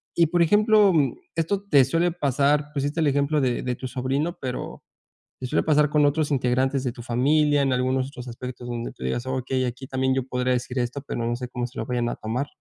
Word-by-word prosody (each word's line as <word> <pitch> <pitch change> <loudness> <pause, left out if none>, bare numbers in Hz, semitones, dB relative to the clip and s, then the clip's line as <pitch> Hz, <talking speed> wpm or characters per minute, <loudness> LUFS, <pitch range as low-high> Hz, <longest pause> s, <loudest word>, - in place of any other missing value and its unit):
y 170 -2 +4
por 170 +1 +3
ejemplo, 210 +2 +5
um, 145 -7 +2 0.2
¿esto 180 +5 -1
te 145 -8 +6
suele 165 +6 +1
pasar? 145 -1 +1
Pusiste 145 +3 -2
el 155 - +3
ejemplo 140 +2 +1
de 125 -2 0
de 125 -1 -2
tu 130 - -6
sobrino, 135 +7 -2
pero, 130 -2 -5 0.6
¿te 130 - -4
suele - - +1
pasar 150 -1 +3
con 150 0 +3
otros 150 +1 +1
integrantes 130 +1 +1
de 125 - 0
tu 120 - -10
familia, 145 +4 +2
en 135 -1 +1
algunos 130 +1 0
otros 125 -3 -9
aspectos 120 +1 -7
donde 120 -1 -4
tú 65 - -11
digas: 90 - -2
"Okey, 130 0 -1
aquí 125 +2 -5
también 130 0 0
yo 135 - 0
podría 125 0 0
decir 125 +1 -2
esto, 125 +3 -2
pero, 115 - -3
no 120 +1 0
sé 125 - -5
cómo 125 -1 -3
se 125 - -15
lo - - -2
vayan 125 -2 -1
a - - -3
tomar?" 120 +6 -3
130 Hz, 230 wpm, -24 LUFS, 125-150 Hz, 0.6 s, te